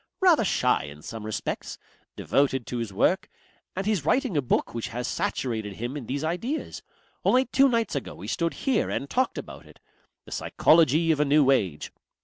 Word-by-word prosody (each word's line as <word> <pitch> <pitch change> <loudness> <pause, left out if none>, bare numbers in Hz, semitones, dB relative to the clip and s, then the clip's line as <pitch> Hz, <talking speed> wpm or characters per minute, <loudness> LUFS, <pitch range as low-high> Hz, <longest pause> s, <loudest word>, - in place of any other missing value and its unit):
"Rather 350 -10 +5
shy 125 - +1
in 75 +1 -11
some 110 -1 -7
respects. 110 0 -4 0.4
Devoted 135 -3 +1
to 125 - -4
his 115 -3 -4
work. 120 - +1 0.5
And 190 +1 -3
he's 210 -8 0
writing 250 - +1
a 145 - +3
book 125 - 0
which 115 -1 -3
has 125 +2 -4
saturated 110 -5 -2
him 120 +7 -5
in 135 -6 -6
these 140 +3 -3
ideas. 225 - -3 0.4
Only 255 +1 +4
two 270 +2 +4
nights 230 -3 0
ago 140 - -4
we 95 - -10
stood 165 +8 -1
here 265 -5 +2
and 140 - -3
talked 255 - 0
about - - -8
it. - - -18 0.5
The - - -14
Psychology 160 0 +3
of 155 - +1
a 150 - +3
New 140 -1 +4
Age. 90 - 0
145 Hz, 185 wpm, -26 LUFS, 120-195 Hz, 0.5 s, Rather